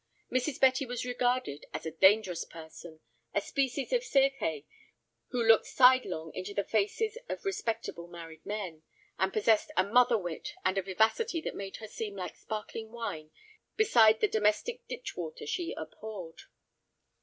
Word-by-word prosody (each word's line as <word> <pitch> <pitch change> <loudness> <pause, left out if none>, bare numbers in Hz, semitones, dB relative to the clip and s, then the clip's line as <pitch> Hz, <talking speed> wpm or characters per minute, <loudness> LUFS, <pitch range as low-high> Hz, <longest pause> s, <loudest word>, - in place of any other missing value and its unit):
Mrs. 255 +2 0
Betty 260 +1 +4
was 245 0 -3
regarded 245 - -1
as - - -5
a 160 - -3
dangerous 190 +1 +4
person, 160 0 -11 0.3
a - - +5
species 270 - -1
of - - +2
Circe 275 - +1 0.6
who 245 -2 -1
looked 225 -1 +5
sidelong 250 - +4
into 200 +2 -6
the 200 - +1
faces 415 - 0
of - - -5
respectable 230 - -3
married 165 -2 -10
men, 190 -7 -5 0.4
and 190 +1 +2
possessed 215 +1 +2
a 185 - +6
mother 240 +3 +4
wit 185 - -5
and 185 +1 +2
a - - 0
vivacity 220 - +1
that - - -4
made 195 -1 -6
her 220 - -8
seem 210 -1 -5
like 185 -2 -5
sparkling 220 +1 -6
wine 195 -10 -5 0.5
beside 225 - +5
the 215 - +5
"domestic 220 - 0
ditch 485 - -6
water" 470 -1 -6
she 365 -6 -2
abhorred. 175 +1 -8
220 Hz, 155 wpm, -31 LUFS, 185-260 Hz, 0.6 s, a